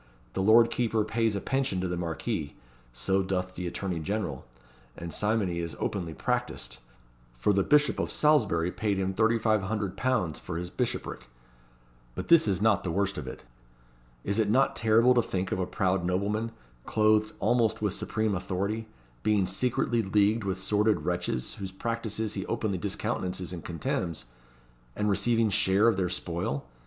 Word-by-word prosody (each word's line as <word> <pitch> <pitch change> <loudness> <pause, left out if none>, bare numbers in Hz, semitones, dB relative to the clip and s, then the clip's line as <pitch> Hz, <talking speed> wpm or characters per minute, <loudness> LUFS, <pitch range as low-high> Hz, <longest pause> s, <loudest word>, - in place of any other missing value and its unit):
The 95 - -1
lord 115 +3 +6
keeper 115 -3 +1
pays 110 -1 0
a - - 0
pension 135 -8 0
to 95 - -1
the 90 - -2
Marquis 85 0 -3 0.4
so 80 +11 0
doth 90 -1 -2
the 90 -1 -4
attorney 90 -1 -3
general 80 - -3 0.5
and 85 -1 -6
simony 105 -5 0
is 85 -4 -4
openly 85 -5 -3
practised; - - -2 0.6
for 105 +12 +2
the 100 - +3
Bishop 150 +7 +3
of - - -1
Salisbury 105 - +3
paid 105 -1 -1
him 95 0 -1
£3,500 110 -2 +1
for 80 - -5
his 85 0 -5
bishopric. - - -3 0.9
But - - -5
this 170 -8 +6
is 100 0 0
not 110 -3 +3
the 90 - -2
worst 100 +2 0
of - - -7
it. - - -8 0.8
Is 100 +3 0
it 105 -2 +2
not 130 +5 +3
terrible 115 +3 +4
to 120 - +4
think 95 -4 -3
of - - -1
a 90 - -1
proud 95 -1 0
nobleman, 100 +5 -1 0.4
clothed 110 0 +3
almost 115 -2 +2
with 105 -3 +1
supreme 110 0 -1
authority, 100 +4 -2 0.3
being 105 -3 +2
secretly 120 +4 0
leagued 105 +2 +2
with 95 -1 -1
sordid 105 +3 +1
wretches, 90 -8 -2
whose 95 -1 -5
practices 110 +1 -3
he 95 - -3
openly 100 -5 -1
discountenances 95 -3 -3
and 85 - -7
contemns, 85 -3 -3 0.7
and 105 0 +1
receiving 115 +1 +2
share 95 +3 +4
of 115 - +4
their 95 -2 0
spoil? 85 -5 -3
100 Hz, 160 wpm, -28 LUFS, 90-110 Hz, 0.9 s, lord